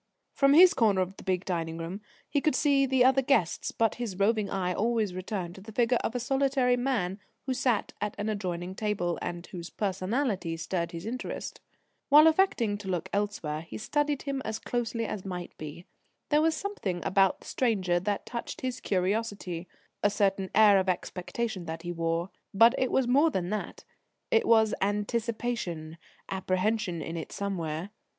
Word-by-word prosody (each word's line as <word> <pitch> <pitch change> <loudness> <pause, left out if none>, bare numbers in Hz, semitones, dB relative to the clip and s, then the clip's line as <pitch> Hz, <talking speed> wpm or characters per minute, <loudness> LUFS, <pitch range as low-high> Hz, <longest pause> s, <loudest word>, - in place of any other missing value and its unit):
From 275 0 +4
his 360 +3 +9
corner 210 - +3
of 185 +1 -3
the - - -11
big 185 -1 -1
dining 165 -3 -2
room 170 +5 -5 0.3
he 285 - 0
could 305 -2 +2
see 275 -2 +3
the 260 -1 +4
other 265 +1 +5
guests, 255 - +1
but 225 -1 +1
his 210 -6 -3
roving 210 +1 +2
eye 180 -2 -1
always 220 -1 0
returned 185 -1 -4
to 190 - -12
the 220 +3 -10
figure 240 +2 +2
of 235 - -2
a - - 0
solitary 265 0 +2
man 235 -7 -1 0.3
who 265 - 0
sat 250 -4 0
at 210 0 -2
an 205 - -3
adjoining 185 -4 -3
table, 190 -4 -1
and 175 0 -4
whose 175 -2 -8
personality 195 -2 -1
stirred 170 +1 -2
his 170 +2 -7
interest. 245 +3 -5 0.5
While 300 +2 +8
affecting 315 - +3
to 205 - -9
look 180 -3 -2
elsewhere, 200 -7 -2
he 165 - -8
studied 295 +4 -1
him 275 -2 -2
as 220 0 -3
closely 230 0 -2
as 200 -3 -4
might 180 -2 -6
be. 155 +3 -8 0.4
There 295 0 +4
was 320 0 +2
something 215 - -4
about 195 -1 +3
the - - -15
stranger 190 -8 +1
that 200 +2 -2
touched 235 -1 -6
his 255 -1 -3
curiosity 190 -2 -1 0.3
a 205 - +4
certain 195 -2 +1
air 210 -2 +7
of 190 0 0
expectation 185 +2 -3
that 160 0 -6
he 175 - -3
wore. 165 +1 -1 0.2
But 230 +4 +7
it 255 - +1
was 265 -2 +2
more 285 +6 +5
than 185 - -2
that: 215 - -4 0.5
it 455 -3 +3
was 220 -2 +5
anticipation, 205 -5 -2 0.3
apprehension 190 -2 -1
in 165 - -5
it 160 - -6
somewhere. 180 -2 -3
205 Hz, 175 wpm, -29 LUFS, 180-245 Hz, 0.5 s, his